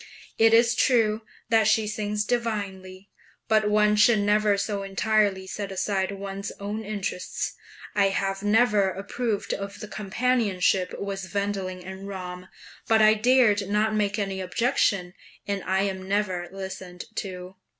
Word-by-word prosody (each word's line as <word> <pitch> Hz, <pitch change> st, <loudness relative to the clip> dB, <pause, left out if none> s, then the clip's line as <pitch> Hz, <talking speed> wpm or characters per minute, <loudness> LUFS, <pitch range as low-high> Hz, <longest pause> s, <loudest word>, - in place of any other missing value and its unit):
It 225 Hz, 0 st, +6 dB
is 230 Hz, +1 st, +5 dB
true 225 Hz, -3 st, +2 dB, 0.3 s
that 225 Hz, -2 st, +4 dB
she 220 Hz, 0 st, +3 dB
sings 210 Hz, 0 st, -2 dB
divinely, 200 Hz, -5 st, -3 dB, 0.4 s
but 215 Hz, -1 st, +3 dB
one 210 Hz, 0 st, +4 dB
should 215 Hz, +2 st, +5 dB
never 205 Hz, 0 st, +2 dB
so 200 Hz, 0 st, -2 dB
entirely 195 Hz, 0 st, +1 dB
set 200 Hz, +1 st, -5 dB
aside 190 Hz, 0 st, -1 dB
one's 195 Hz, 0 st, -5 dB
own 205 Hz, +2 st, -4 dB
interests. 200 Hz, -3 st, -3 dB, 0.4 s
I 200 Hz, -1 st, +3 dB
have 195 Hz, 0 st, -1 dB
never 210 Hz, -1 st, +3 dB
approved 205 Hz, +3 st, -3 dB
of 200 Hz, 0 st, -6 dB
the 210 Hz, -, -7 dB
companionship 205 Hz, -4 st, 0 dB
with 195 Hz, -1 st, -5 dB
Wendling 195 Hz, -3 st, -2 dB
and 190 Hz, +1 st, -8 dB
Ramm, 180 Hz, -2 st, -7 dB, 0.4 s
but 220 Hz, -1 st, +5 dB
I 215 Hz, 0 st, +7 dB
dared 215 Hz, -3 st, +3 dB
not 210 Hz, +1 st, +1 dB
make 205 Hz, -1 st, 0 dB
any 195 Hz, -2 st, -2 dB
objection, 195 Hz, -4 st, 0 dB, 0.3 s
and 200 Hz, -1 st, -1 dB
I 190 Hz, +1 st, +1 dB
am 190 Hz, -1 st, -3 dB
never 190 Hz, -3 st, -1 dB
listened 190 Hz, -2 st, -7 dB
to. 185 Hz, -1 st, -6 dB
200 Hz, 140 wpm, -26 LUFS, 190-215 Hz, 0.4 s, I